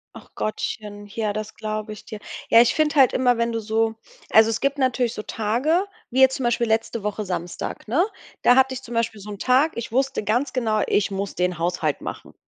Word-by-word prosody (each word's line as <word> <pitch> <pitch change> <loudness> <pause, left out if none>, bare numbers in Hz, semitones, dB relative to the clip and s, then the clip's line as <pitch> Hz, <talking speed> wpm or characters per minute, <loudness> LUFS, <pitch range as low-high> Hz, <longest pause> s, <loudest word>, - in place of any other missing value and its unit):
Ach - - -13
Gottchen, 210 -1 -4
ja, 210 +1 -2
das 215 +1 -5
glaube 215 0 -4
ich 210 - -11
dir. 215 - -8 0.3
Ja, 230 - +8
ich 240 - +2
finde 305 -1 +1
halt 265 -2 +6
immer, 250 -2 +3
wenn 235 0 0
du 230 - -2
so 220 +1 0 0.4
also 220 0 +6
es 225 - -2
gibt 280 +1 0
natürlich 255 -3 +1
so 215 - -5
Tage, 250 - 0 0.3
wie 260 - +1
jetzt 265 0 +6
zum 260 - -4
Beispiel 240 0 +1
letzte 225 0 0
Woche 210 +1 -3
Samstag, 175 +2 -5
ne, 285 +11 +3 0.4
da 245 - +6
hatte 265 0 +4
ich 255 - -7
zum 240 - -8
Beispiel 225 -2 -1
so 205 +2 -9
'n 205 - -7
Tag, 265 +8 +3
ich 235 -1 -5
wusste 265 -3 0
ganz 245 +6 0
genau: 220 -4 0
„Ich 205 - +1
muss 195 0 -3
den 180 -1 -1
Haushalt 170 -4 -1
machen.“ - - -7
225 Hz, 220 wpm, -23 LUFS, 210-255 Hz, 0.4 s, Ja